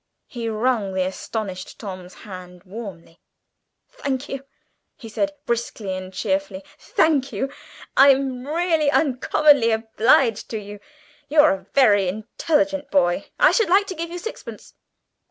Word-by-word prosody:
He 235 -2 -5
wrung 220 -3 0
the 185 -1 +1
astonished 190 0 -5
Tom's 185 -3 -8
hand 180 -2 -10
warmly; 185 -5 -10 0.7
"Thank 280 - -4
you," 275 0 -5 0.5
he 230 - -10
said, 295 +7 -1
briskly 225 -4 -3
and 185 0 -6
cheerfully, 195 -1 -2 0.2
"thank 290 -4 +1
you. 270 +1 -3 0.4
I'm 270 -2 +4
really 325 -1 +1
uncommonly 285 -2 +3
obliged 225 +1 +2
to 225 - -3
you. 205 0 -10 0.5
You're 300 +1 +6
a 190 0 -4
very 205 -8 +5
intelligent 290 - -1
boy. 175 -2 +1
I - - +6
should 450 -6 +2
like 395 +3 +4
to 390 - -5
give 335 +1 -4
you 350 - -6
sixpence." 445 +6 -8
230 Hz, 135 wpm, -22 LUFS, 195-290 Hz, 0.7 s, You're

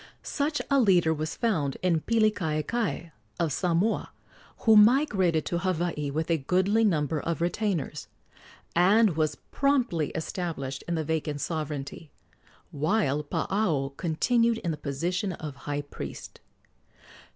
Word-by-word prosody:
Such 295 +1 -1
a 280 - +5
leader 180 -8 +4
was 155 0 -4
found 160 - 0
in 170 -3 +2
Pilikaekae, 205 -3 0 0.3
of 165 -4 0
Samoa, 180 +6 0 0.5
who 220 -1 +5
migrated 210 - +4
to 170 - -1
Hawaii 170 -5 -1
with 160 +4 -2
a 165 - +2
goodly 190 +9 +2
number 155 -6 +1
of 170 +2 -3
retainers, 175 -4 -2 0.7
and 195 +2 +4
was 155 -2 0
promptly 250 - 0
established 160 -5 -4
in 170 - -1
the 160 - -1
vacant 155 -1 -2
sovereignty, 150 0 -4 0.6
while 150 -2 0
Paao 150 -4 -1
continued 230 - +1
in 170 - 0
the - - -2
position 170 +7 -2
of 150 -4 -7
high 145 0 -1
priest. 145 - -8
170 Hz, 125 wpm, -27 LUFS, 150-205 Hz, 0.7 s, a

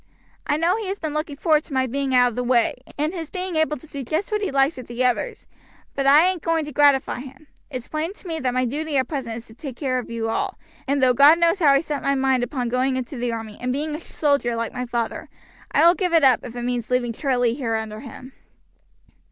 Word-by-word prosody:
"I 295 - +2
know 340 +5 +2
he 440 -3 -4
has 390 +1 -3
been 310 -3 -4
looking 305 -1 -3
forward 305 0 +2
to 290 - -9
my 260 0 +2
being 265 +1 -1
out 245 0 +5
of 230 - -9
the 250 - -1
way, 240 -2 +2 0.2
and 305 +4 -1
his 330 -4 -5
being 370 -2 -4
able 315 -1 +1
to 255 - -14
do 285 -2 -7
just 320 - -2
what 425 0 0
he 405 - -1
likes 275 +2 +2
with 255 - -8
the 240 +2 -1
others, 250 - -1 0.5
but 275 0 -1
I 295 +5 +7
ain't 370 -3 -1
going 330 -2 0
to 300 - -7
gratify 280 -2 +3
him. 270 +3 -11 0.2
It's 255 -4 -6
plain 315 +4 -3
to 380 - -13
me 325 -1 -3
that 255 -3 0
my 255 0 +2
duty 295 +4 -2
at 260 -2 +1
present 260 -7 -4
is 235 - -9
to 220 - -15
take 265 +1 -8
care 255 -2 -1
of 245 - -8
you 230 -1 -3
all, 225 - -2 0.3
and 280 0 +1
though 255 -1 +5
God 285 +6 +7
knows 340 +3 +2
how 320 - +3
I 275 0 +4
set 300 -3 -4
my 275 - +1
mind 265 -1 +2
upon 245 0 -2
going 255 +2 +1
into 255 +2 -4
the 240 -1 -2
army 225 -2 -6
and 250 0 -1
being 300 +4 -2
a 305 - -4
soldier 280 -7 0
like 230 0 -3
my 250 0 -4
father, 235 -1 -3 0.4
I - - +4
will 340 - +8
give 360 -2 -1
it 325 - +5
up 260 -4 +6
if 240 -1 -9
it 240 - -4
means 245 -2 -2
leaving 250 -2 0
Charlie 245 -2 +1
here 240 -4 -2
under 220 -1 -4
him." 260 +1 -11
270 Hz, 260 wpm, -23 LUFS, 245-310 Hz, 0.5 s, will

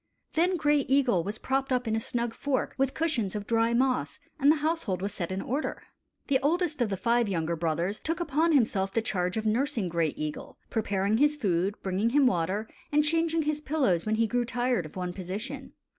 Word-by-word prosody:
Then 355 +3 +2
Gray 295 -2 +3
Eagle 255 -10 +3
was 205 +4 -4
propped 270 +2 -1
up 250 -1 +1
in 220 - +1
a - - +1
snug 235 +1 -2
fork 275 +2 -1
with 270 0 0
cushions 245 - 0
of 205 -1 -4
dry 230 +1 +2
moss, 255 +1 +1 0.2
and 285 +1 +6
the - - +4
household 315 - -1
was 200 +2 -3
set 175 -1 -4
in 190 +1 -3
order. 275 +6 -3 0.4
The 270 -2 +2
oldest 315 0 +1
of 235 - +2
the 195 - -2
five 235 +3 +2
younger 170 -2 -1
brothers 170 +5 -1
took 330 +2 -2
upon 325 0 +1
himself 210 -8 +2
the 225 - 0
charge 180 -2 -1
of 220 - -2
nursing 230 -2 0
Gray 165 -2 +1
Eagle, 155 -1 -5
preparing 205 -1 +1
his 295 +3 +3
food, 195 - 0
bringing 195 +4 +1
him 280 +2 +4
water, 195 +1 0 0.2
and 300 0 +4
changing 325 +1 +1
his 300 0 -1
pillows 265 - +1
when 215 0 0
he 225 +1 +2
grew 245 +2 0
tired 240 -6 0
of - - -17
one 180 -1 -3
position. 190 +6 -6
230 Hz, 205 wpm, -28 LUFS, 195-285 Hz, 0.4 s, and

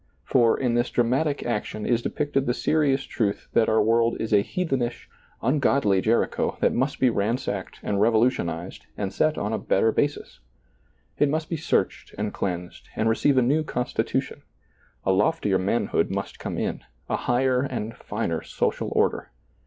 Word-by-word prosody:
For, 120 -3 +3
in 125 -3 +1
this 120 +1 +1
dramatic 135 +5 +1
action 110 -2 -3
is 120 -1 +2
depicted 140 0 -1
the 120 - +1
serious 145 -4 +1
truth 105 -4 -2
that 115 - +3
our 110 - +3
world 115 +1 +2
is 110 - -2
a 100 - +6
heathenish, 130 - -2 0.4
ungodly 130 -6 +2
Jericho 115 +3 +1
that - - +2
must 130 +3 -1
be 130 -2 +4
ransacked 100 -2 -2
and 100 -1 0
revolutionized 110 -7 +1
and 100 -2 -3
set 155 +5 +1
on 105 +2 -2
a 110 - -1
better 105 +3 +2
basis; 145 +4 -2 0.8
it 145 - +4
must 155 +2 -2
be - - +1
searched 160 - -1
and 105 0 -2
cleansed 90 -2 -4
and 110 - +1
receive 130 +4 +2
a 130 - +5
new 145 +6 +2
constitution; 125 -4 -2 0.6
a 95 - +3
loftier 105 -1 +2
manhood 100 +5 0
must - - -4
come - - -4
in, - - -2 0.2
a - - 0
higher 125 +1 +1
and 120 -5 -4
finer - - -3
social - - -2
order. - - +1
120 Hz, 160 wpm, -25 LUFS, 105-135 Hz, 0.8 s, a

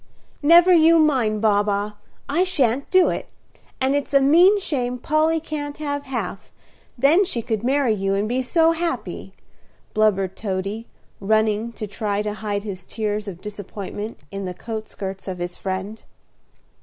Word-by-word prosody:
"Never 340 +4 +7
you 330 0 +6
mind, 250 -9 +2
Baa 205 -2 +4
baa; 205 0 -1 0.4
I 325 +6 +2
shan't 280 -8 0
do 370 -1 +5
it; - - -4 0.5
and 265 +1 +1
it's 285 0 -1
a - - +8
mean 345 +9 +5
shame 250 -9 -2
Polly 310 +5 +1
can't 295 -2 -5
have 285 -1 -3
half; 225 -7 -5 0.5
then 295 +10 +5
she 240 - -3
could 220 -1 -2
marry 265 -2 +2
you 195 -1 -1
and 205 +2 0
be 250 +3 0
so 325 +6 +3
happy," 330 0 -3 0.6
blubbered 195 -3 +2
Toady, 200 +2 -4 0.3
running 215 +2 +1
to 220 - -5
try 210 0 -2
to 210 0 -3
hide 205 -1 -3
his 190 -4 -6
tears 210 +1 -3
of 185 -2 -7
disappointment 205 +1 -7
in 195 0 -5
the 180 -1 -5
coat 220 +2 -6
skirts 195 0 -7
of 185 -1 -4
his 175 0 -5
friend. 190 +3 -4
220 Hz, 160 wpm, -22 LUFS, 205-290 Hz, 0.6 s, a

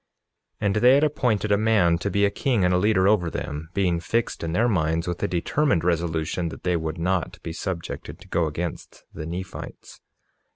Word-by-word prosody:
47:6 - - -1
And 100 0 +2
they 125 +4 +6
had 145 - +3
appointed 120 -8 +1
a 100 - +5
man 100 -7 +3
to 100 - -2
be 100 +1 +2
a 100 - +1
king 110 -2 +1
and 90 - +3
a 90 - +3
leader 95 -1 +3
over 100 -5 +3
them, 75 0 -5
being 90 -4 +1
fixed 115 +5 -1
in 80 - -2
their 110 +8 +2
minds 80 -5 0
with 85 -1 -3
a - - +1
determined 90 - +1
resolution 85 0 -1
that - - -10
they 90 -1 +1
would 80 0 -3
not 90 -1 -1
be 80 - -5
subjected 85 0 -5
to - - -15
go 85 -2 +1
against 85 +3 -5
the 75 - -6
Nephites. 90 +2 -8
90 Hz, 205 wpm, -24 LUFS, 85-105 Hz, -, they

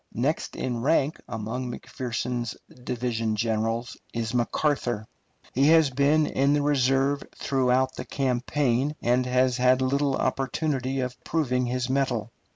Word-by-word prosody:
Next 140 +8 -1
in 120 -2 -2
rank 145 +2 +1
among 115 +4 -4
McPherson's 120 -1 -4 0.3
division 115 -3 -1
generals 115 +2 -1 0.2
is 115 -1 -2
McArthur. 120 -2 0 0.5
He 135 +3 +3
has 160 -3 +5
been 145 +4 +3
in 140 +1 +2
the 145 -1 +2
reserve 135 0 +2
throughout 130 -1 +1
the - - -6
campaign, 135 +1 0
and 125 +1 +2
has 125 0 +2
had 125 +1 +4
little 135 +1 +1
opportunity 135 0 -1
of 125 -1 -5
proving 125 -6 0
his 125 0 -1
mettle. 130 -4 0
130 Hz, 130 wpm, -26 LUFS, 120-140 Hz, 0.5 s, has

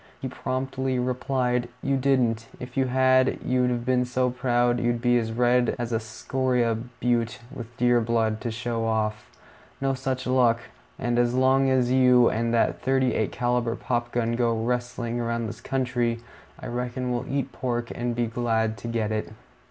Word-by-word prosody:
He 130 - -4
promptly 130 0 -2
replied, 125 -1 0
"You 135 0 +1
didn't; 125 -4 +1
if 125 - -8
you 135 -1 +2
had, 130 0 +3
you'd 125 -1 +2
have 120 -1 -2
been 125 -1 +2
so 125 0 0
proud 120 -1 +1
you'd 120 0 0
be 120 +1 +2
as 110 -1 -3
red 120 +1 +2
as 120 -1 -3
a 115 - +1
scoria 120 +1 0 0.3
butte 120 -1 0 0.2
with 120 0 -9
deer 120 -1 +3
blood, 110 -1 0
to 120 - -2
show 115 0 -3
off. 110 -1 -1 0.5
No 135 0 +1
such 130 -1 -3
luck; 125 -2 +3 0.4
and 120 -1 0
as 120 0 +2
long 135 +1 +4
as 125 -2 +2
you 125 -2 +5
and 115 +1 0
that 115 -1 +1
thirty 130 -2 +2
eight 110 - 0
caliber 120 -1 0
pop 120 -1 -2
gun 115 -1 0
go 115 -1 +1
rustling 120 0 -2
around 115 0 -1
this 110 +2 -7
country, 120 -3 -1 0.4
I - - -9
reckon 125 +1 -3
we'll 125 +2 -2
eat 140 0 -1
pork 120 -2 -3
and 120 0 -2
be 120 0 +1
glad 115 -1 0
to 120 - -7
get 115 -2 -1
it." 110 0 -3
120 Hz, 175 wpm, -25 LUFS, 115-130 Hz, 0.5 s, you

